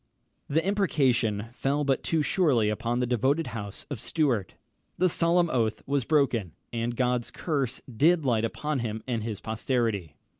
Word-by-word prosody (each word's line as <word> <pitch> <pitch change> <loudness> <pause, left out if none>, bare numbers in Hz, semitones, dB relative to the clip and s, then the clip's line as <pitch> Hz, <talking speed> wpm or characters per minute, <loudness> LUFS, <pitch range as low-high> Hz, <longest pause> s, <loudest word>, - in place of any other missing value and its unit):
] - - -47
The 160 +4 +1
imprecation 130 - +1
fell 140 +3 0
but 135 -2 +1
too 160 -2 +1
surely 140 - +3
upon 115 +3 -1
the - - +2
devoted 130 +6 +1
house 100 -3 -6
of 135 - -3
Stuart. 125 - 0 0.4
The 185 - +4
solemn 170 +1 +3
oath 115 -3 0
was 140 -3 0
broken, 125 - +1 0.2
and 120 0 -2
God's 125 -2 +1
curse 140 -6 -2
did 155 +6 +2
light 115 -4 +2
upon 150 +5 -2
him 110 -2 -3
and 120 -3 -1
his 110 -2 -5
posterity! 110 - -1
125 Hz, 160 wpm, -27 LUFS, 115-150 Hz, 0.4 s, The